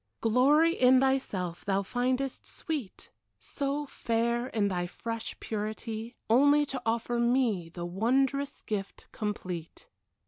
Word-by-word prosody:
Glory 285 +8 +4
in 255 -3 +5
thyself 210 -10 0
thou 195 0 +1
findest 255 +5 -1
sweet. 295 - -5 0.3
So 285 +1 -3
fair 235 -1 -1
in 215 -5 0
thy 175 -2 -1
fresh 230 +5 -6
purity, 220 +2 -4
Only 285 +5 +5
to 270 -2 -5
offer 235 +1 0
me 235 -8 +2
The 175 +1 -6
wondrous 265 +9 0
gift 200 -2 -5
complete. 180 -6 -5
235 Hz, 115 wpm, -29 LUFS, 205-265 Hz, 0.3 s, in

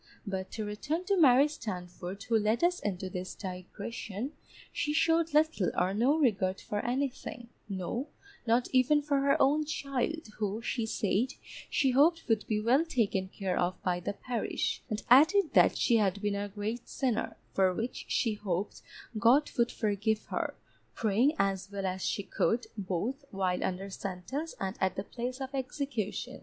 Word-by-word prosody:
But 190 -2 -3
to 215 -2 -3
return 290 - -2
to 400 - +2
Mary 280 -6 +7
Standford, 190 -7 -6
who 230 0 +2
led 215 +7 +1
us 355 +1 +3
into 190 -2 -3
this 185 0 -5
digression. 200 +5 -6 0.4
She 295 - -1
showed 330 +1 +3
little 300 - +3
or 185 +2 +2
no 250 +9 +3
regard 195 -10 +2
for 205 - -3
anything; 245 -2 -3 0.2
no, 200 - -3 0.4
not 235 +2 +3
even 285 +4 +4
for 285 -1 +1
her 280 +3 +3
own 295 +3 +4
child, 295 +1 -2
who, 210 0 -1
she 230 0 -2
said, 220 +4 0 0.4
she 270 -2 +2
hoped 320 +6 +4
would 225 -3 +1
be 215 -1 +1
well 245 +8 +4
taken 215 - 0
care 190 -1 -3
of 175 +1 0
by 180 -1 +1
the 180 - -3
parish, 240 +3 -2
and 215 -1 -3
added 320 +8 +6
that - - +5
she 235 - +4
had 200 -2 +1
been 205 0 0
a 200 0 -2
great 215 +4 -4
sinner, 250 -5 -1 0.2
for 190 -1 +4
which 225 +7 -4
she 225 -3 +1
hoped 200 -2 -3 0.4
God 255 +7 +5
would 235 0 +3
forgive 215 0 0
her, - - -2 0.4
praying 225 +7 +3
as 195 0 0
well 200 -1 -3
as 185 0 -2
she 200 - -1
could, 235 +4 0
both 205 - -3
while 185 -2 -1
under 190 +1 -3
sentence 200 - -5
and 190 +1 -2
at 190 -1 +1
the 195 - -3
place 250 +4 -5
of 265 0 -5
execution. 260 -2 -3
225 Hz, 170 wpm, -31 LUFS, 195-270 Hz, 0.4 s, Mary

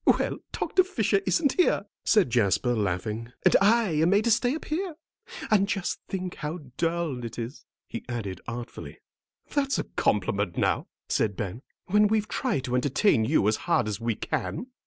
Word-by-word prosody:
"Well, - - +2
Doctor 370 - +2
Fisher 220 - +1
isn't 270 - +2
here," 360 - +4 0.2
said 205 - +3
Jasper, 120 +2 +2
laughing, 105 +4 -2
"and - - +6
I 220 +1 +4
am 165 - +4
made 200 +3 +4
to 235 - +2
stay 245 +5 +2
up 315 - -7
here. 340 +1 -2 0.6
And 200 -2 +4
just 195 -3 -2
think 185 -2 -4
how 155 +3 -4 0.2
dull 165 -6 -1
it 115 - -6
is," 120 +4 -6 0.2
he 115 - -6
added 100 -7 -4
artfully. 120 +1 -7 0.6
"That's 275 -2 +1
a - - 0
compliment, 100 -2 0
now," - - +1 0.2
said 105 -3 +1
Ben, 105 +3 -4 0.2
"when 210 +2 +4
we've 215 0 +1
tried 235 - -1
to 125 - -4
entertain 125 - +3
you 105 - +3
as 110 - +2
hard - - +3
as 105 +1 -3
we 115 -1 0
can." 250 - -3
160 Hz, 175 wpm, -27 LUFS, -, 0.6 s, and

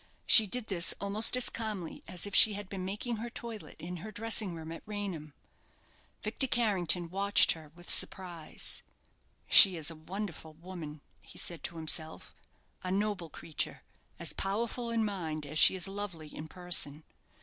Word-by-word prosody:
She 220 -2 +9
did 245 +4 -1
this 185 -4 0
almost 210 +5 +1
as 250 - +5
calmly 210 -7 -5
as 180 - -1
if 205 - -8
she 215 - +7
had 205 -1 -7
been 195 -2 -5
making 210 +5 -4
her 235 +2 -6
toilet 230 -2 -9
in 180 +2 -7
her 210 +6 -8
dressing 215 -3 +1
room 160 0 -8
at 165 - -8
Raynham. 190 -8 -6 0.9
Victor 230 +5 0
Carrington 190 -8 +1
watched 200 +2 +5
her 155 -2 -7
with 175 0 -13
surprise. 175 -4 -1 0.7
"She 195 -3 +9
is 160 -1 0
a - - -10
wonderful 170 -1 -7
woman," 160 -3 -9 0.2
he - - -14
said 170 -4 -1
to 170 - -4
himself; 160 0 -3 0.5
"a 185 - -3
noble 200 -3 -2
creature. 155 0 -4 0.3
As - - 0
powerful 235 +4 -2
in 230 -1 0
mind 160 -7 -4
as 155 +2 -1
she - - +8
is 185 -1 -2
lovely 195 -6 -6
in 155 - -7
person. 160 -4 -3
185 Hz, 165 wpm, -31 LUFS, 165-210 Hz, 0.9 s, She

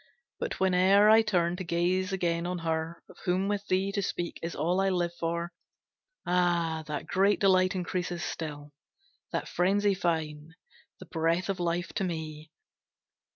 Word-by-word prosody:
But - - -2
whene'er 190 +3 +5
I 220 +1 +8
turn 180 -5 +1
To 185 - -4
gaze 180 +2 0
again 170 -2 0
on 180 0 -2
her, 160 +1 -2
of - - -16
whom 185 +2 +1
with 205 0 -2
thee 190 +2 +1
To 200 - -1
speak, 175 -2 -3
is 170 +1 -4
all 175 +4 +1
I 195 - +2
live 175 -2 0
for, 170 +1 -2 0.7
ah, 170 -3 +1
That 150 -2 -4
great 200 +2 +2
delight 185 -1 +4
increases 180 -1 -2
still, 150 -3 -5 0.6
That - - -2
frenzy 200 +3 +2
fine, 160 -3 -2 0.4
the - - -10
breath 165 +3 0
of 195 -1 -1
life, 175 0 -1
to 200 - -1
me! 155 -3 -5
175 Hz, 155 wpm, -29 LUFS, 165-190 Hz, 0.7 s, I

